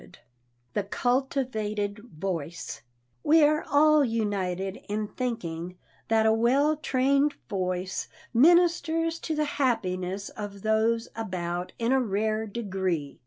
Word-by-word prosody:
[Sidenote: - - -16 0.6
THE 205 - 0
CULTIVATED 220 -4 -1 0.2
VOICE] 170 -7 -4 0.4
We 315 +1 +5
are 305 +1 +4
all 305 +1 +6
united 195 -5 -1
in 210 +1 -1
thinking 180 -8 -4 0.3
that 220 0 +3
a 220 - +5
well 265 +7 +3
trained 280 0 +2
voice 185 -1 -2 0.3
ministers 330 +3 +4
to 320 - -3
the 305 0 +1
happiness 200 -9 -1
of 200 -2 -8
those 225 +2 +2
about 180 -5 -3
in 235 +1 0
a 265 0 +4
rare 215 0 -1
degree. 190 -9 -3
220 Hz, 120 wpm, -27 LUFS, 190-270 Hz, 0.6 s, all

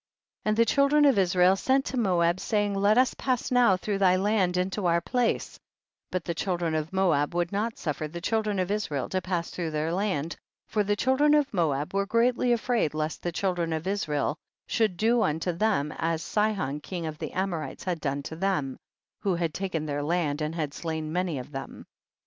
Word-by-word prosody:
10. - - +1
And 215 - +1
the 230 - +5
children 280 +5 +4
of 270 -8 +5
Israel 180 0 +4
sent 265 +7 +1
to - - -4
Moab, 180 -6 +2
saying, 205 -1 0
let 200 +3 +3
us 255 0 +4
pass 255 -2 -1
now 245 -7 +5
through 200 +2 -2
thy 185 -2 +5
land 190 -2 +1
into 185 +1 0
our 170 0 +3
place, 245 +5 -1 0.5
but 180 -2 -3
the 170 - -1
children 170 -2 -1
of 155 0 -2
Moab 175 -5 +1
would 175 0 0
not 215 +3 -2
suf 150 -4 -3
fer 155 - -3
the 170 +3 -7
children 215 +2 0
of 185 +1 -1
Israel 155 -11 -2
to 185 - -1
pass 175 -2 -2
through 170 -2 -3
their 155 +2 -1
land, 180 -5 -1 0.3
for 210 - 0
the 205 +1 +1
children 265 +6 +3
of 290 -4 +1
Moab 150 -5 0
were 200 0 0
greatly 240 +2 +2
afraid 235 - +1
lest 155 0 -2
the 175 - -2
children 175 -2 -1
of 160 +1 -3
Israel 155 -7 -1 0.3
should 215 -6 0
do 230 +3 +3
unto 160 0 0
them 170 -5 0
as 165 0 -1
Sihon 205 -10 0
king 170 +2 -5
of 155 -1 -5
the - - -4
Amorites 175 -7 -3
had 175 -4 -2
done 140 -1 -2
to 160 - -6
them, 160 -7 -1 0.4
who 195 -3 0
had 170 -2 -1
taken 185 -5 -3
their 145 -1 -2
land 155 -1 0
and 155 +2 -2
had 150 -4 -2
slain 160 -2 -4
many 180 -4 -1
of 130 +3 -7
them. 135 -1 -7
180 Hz, 205 wpm, -27 LUFS, 160-210 Hz, 0.5 s, the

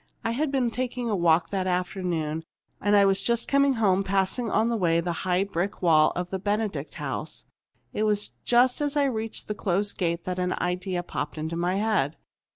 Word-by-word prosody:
I 230 - 0
had 290 +6 0
been 255 -4 +1
taking 245 -1 -3
a - - +2
walk 170 -2 +3
that 190 -2 -1
afternoon 180 -4 -2 0.4
and 205 0 +5
was 195 0 +2
just 235 +1 0
coming 280 -1 +3
home, 195 -4 +2
passing 195 +5 0
on 220 +3 +2
the 235 - 0
way 170 -5 +2
the 175 +1 -1 0.2
high 180 +2 +3
brick 195 0 -3
wall 155 -3 +5
of 180 0 -3
the 190 - -2
Benedict 210 +1 -2
house. - - -5 0.5
It - - -2
was 210 -1 +1
just 245 +3 +3
as 290 0 -1
I 290 - +4
reached 225 -4 -3
the 210 - -2
closed 200 0 0
gate 170 -2 0
that 185 0 -3
an 180 0 0
idea 180 0 -2
popped 150 -3 -5
into 160 +2 -3
my 175 +2 0
head. 200 -9 0
195 Hz, 195 wpm, -26 LUFS, 175-225 Hz, 0.5 s, and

